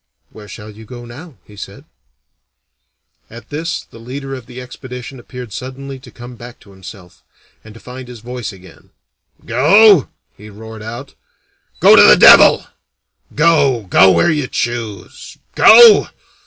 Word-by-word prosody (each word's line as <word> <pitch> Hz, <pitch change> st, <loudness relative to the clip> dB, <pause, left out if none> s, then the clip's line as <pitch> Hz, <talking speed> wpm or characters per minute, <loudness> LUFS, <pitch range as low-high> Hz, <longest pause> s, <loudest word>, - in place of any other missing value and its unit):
"Where 105 Hz, -1 st, -15 dB
shall 105 Hz, +2 st, -12 dB
you 110 Hz, +2 st, -16 dB
go 120 Hz, +2 st, -13 dB
now?" 135 Hz, +4 st, -14 dB
he 105 Hz, -, -19 dB
said. -, -, -12 dB, 1.4 s
At 115 Hz, +1 st, -15 dB
this 160 Hz, +3 st, -6 dB
the -, -, -18 dB
leader 135 Hz, +4 st, -9 dB
of 130 Hz, -3 st, -10 dB
the 125 Hz, 0 st, -12 dB
expedition 125 Hz, 0 st, -11 dB
appeared 125 Hz, -3 st, -12 dB
suddenly 135 Hz, +2 st, -10 dB
to -, -, -17 dB
come 120 Hz, 0 st, -13 dB
back 120 Hz, +1 st, -14 dB
to 100 Hz, -, -20 dB
himself, 95 Hz, -1 st, -15 dB, 0.4 s
and 110 Hz, 0 st, -16 dB
to -, -, -15 dB
find 125 Hz, +1 st, -12 dB
his 125 Hz, -2 st, -13 dB
voice 125 Hz, -1 st, -8 dB
again. 95 Hz, -3 st, -19 dB, 0.6 s
"Go?" 165 Hz, -, +3 dB, 0.3 s
he 105 Hz, +1 st, -15 dB
roared 110 Hz, +1 st, -13 dB
out. 120 Hz, +5 st, -10 dB, 0.7 s
"Go -, -, +5 dB
to -, -, +6 dB
the -, -, +6 dB
devil! -, -, +5 dB, 0.7 s
Go? 145 Hz, -7 st, 0 dB
Go 95 Hz, -, +4 dB
where 170 Hz, -, +1 dB
you 150 Hz, -4 st, -3 dB
choose! 115 Hz, -7 st, -7 dB, 0.2 s
Go? 225 Hz, -2 st, +6 dB
125 Hz, 150 wpm, -14 LUFS, 110-135 Hz, 1.4 s, to